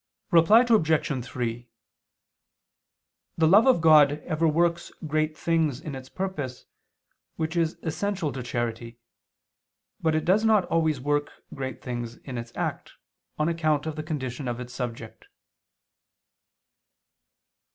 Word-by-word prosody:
Reply 205 +9 +6
Obj. 160 - +2
3: 120 -1 -4 1.7
The 160 -1 +4
love 205 +9 +6
of 255 -10 +4
God 155 -3 +6
ever 160 +1 +1
works 170 +2 +1
great 155 0 -1
things 160 -6 0
in 155 -2 -7
its 130 -1 -8
purpose, 150 -10 -5 0.7
which 160 +1 -3
is 165 -1 0
essential 180 -1 -2
to 130 - -5
charity; 120 -1 -4 1.0
but 160 -1 +1
it 155 - 0
does 195 +5 +3
not 215 -4 +4
always 160 -3 +1
work 145 +2 0 0.2
great 130 -3 -6
things 120 -2 -5
in 125 -3 -7
its 115 0 -8
act, - - -4 0.4
on 150 - +1
account 155 -3 0
of 160 -1 -4
the 155 - -4
condition 140 -4 -4
of 120 0 -3
its 125 0 -8
subject. 115 -3 -6
155 Hz, 130 wpm, -26 LUFS, 125-165 Hz, 1.7 s, Reply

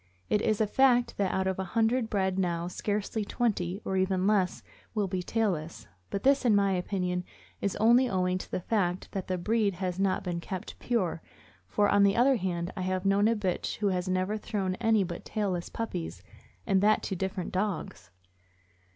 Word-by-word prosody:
It 210 - +3
is 215 -2 +1
a 220 - +3
fact 245 +2 +3
that 195 -2 +1
out 190 - 0
of 190 0 -1
a - - 0
hundred 225 +1 +2
bred 190 -2 0
now 170 -2 0
scarcely 205 +3 -2
twenty, 200 -5 -1
or 190 - -1
even 190 0 +1
less, 195 -3 +1 0.3
will 205 -2 +1
be 185 -1 -2
tailless, 170 - -2 0.2
but 200 - -3
this, 275 +1 +4
in 230 -4 +4
my 200 -1 +3
opinion, 180 -1 -1 0.4
is 200 - -1
only 240 +4 +4
owing 185 -1 0
to - - -8
the - - -2
fact 180 -3 -1
that 190 -2 -4
the 185 - -1
breed 210 +1 +1
has 185 0 -3
not 195 -1 +1
been 175 -2 -2
kept 185 +1 -6
pure; 190 -9 -1 0.5
for, 205 - +2
on 205 - +4
the 200 0 +5
other 255 +2 +4
hand, 175 -3 -2
I - - -4
have 185 +1 -1
known 200 +2 +4
a 230 - +3
bitch 190 -4 -2
which 200 -3 +1
has 180 0 -2
never 185 +3 0
thrown 195 -4 -2
any 220 -3 +4
but 170 -1 -6
tailless 190 -5 -2
puppies, 90 - -5 0.4
and 190 -1 +3
that 215 +1 +3
to 195 - -2
different 190 0 -3
dogs. 185 - -3
190 Hz, 195 wpm, -29 LUFS, 180-210 Hz, 0.5 s, the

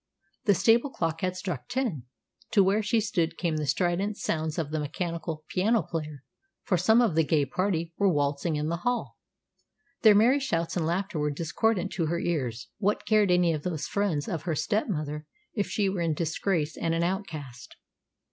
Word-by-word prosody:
The 205 - +5
stable 230 - +4
clock 165 -9 -2
had 185 0 -1
struck 180 -8 -4
ten. 240 - -2 0.5
To 200 -4 +6
where 200 +3 +2
she 220 +2 +2
stood 170 -6 -1
came 165 -4 -1
the 150 -1 -2
strident 185 +6 0
sounds 155 -1 -2
of 155 -3 -2
the 155 - -1
mechanical 160 +1 -4
piano 215 +4 +2
player, 150 -4 -5 0.4
for 185 - +1
some 220 +7 +4
of 225 - +2
the 160 +1 +3
gay 150 -1 +2
party 170 +1 -1
were 200 -1 +4
waltzing 145 +1 0
in 150 0 -1
the 170 +1 -1
hall. 245 +8 -2 0.8
Their 215 -3 +7
merry 240 +7 +5
shouts 170 -12 -1
and 165 -3 0
laughter 185 0 -1
were 150 0 +1
discordant 180 +6 0
to 170 -4 -1
her 170 +2 0
ears. 130 -9 -2
What 205 0 0
cared 215 -3 +4
any 180 -2 +4
of 155 - -3
those 160 -2 -3
friends 185 -8 -1
of 165 - -2
her 170 -3 -2
step 160 +9 0
mother 150 -3 -3 0.3
if 205 -3 -1
she 205 -2 +1
were 190 -2 -1
in 165 -2 +1
disgrace 160 -1 -1
and 165 0 -1
an 165 - +1
outcast? 155 - -4
170 Hz, 190 wpm, -28 LUFS, 155-200 Hz, 0.8 s, Their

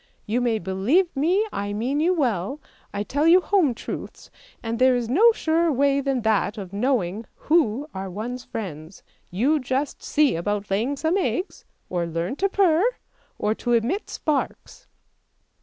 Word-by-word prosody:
You 235 +3 0
may 235 -2 +1
believe 215 - +1
me 350 +10 +2
I 205 0 -3
mean 250 +7 -1
you 335 +4 +3
well, 250 - -1 0.3
I 200 0 -3
tell 290 +8 0
you 350 +2 +7
home 360 - +2
truths, - - -8 0.3
and 230 0 -3
there 255 0 +5
is 240 -2 -1
no 405 - +5
surer 330 -5 +1
way 280 +1 +2
than 270 -3 -1
that 220 0 +1
of 195 -2 -7
knowing 215 -3 -1
who 295 -4 +1
are 190 0 -5
one's 240 +6 -5
friends. 170 -7 -7 0.3
You 265 - +1
just 265 +2 -2
see 295 - +2
about 205 +4 -2
laying 235 +9 0
some 320 +6 +1
eggs, 375 0 -2 0.2
or 175 -2 -2
learn 170 +7 -3
to 395 - +1
purr, 365 -4 +3 0.5
or 210 - 0
to 240 +2 -2
emit 240 - 0
sparks." 300 -3 -3
250 Hz, 160 wpm, -24 LUFS, 205-305 Hz, 0.5 s, you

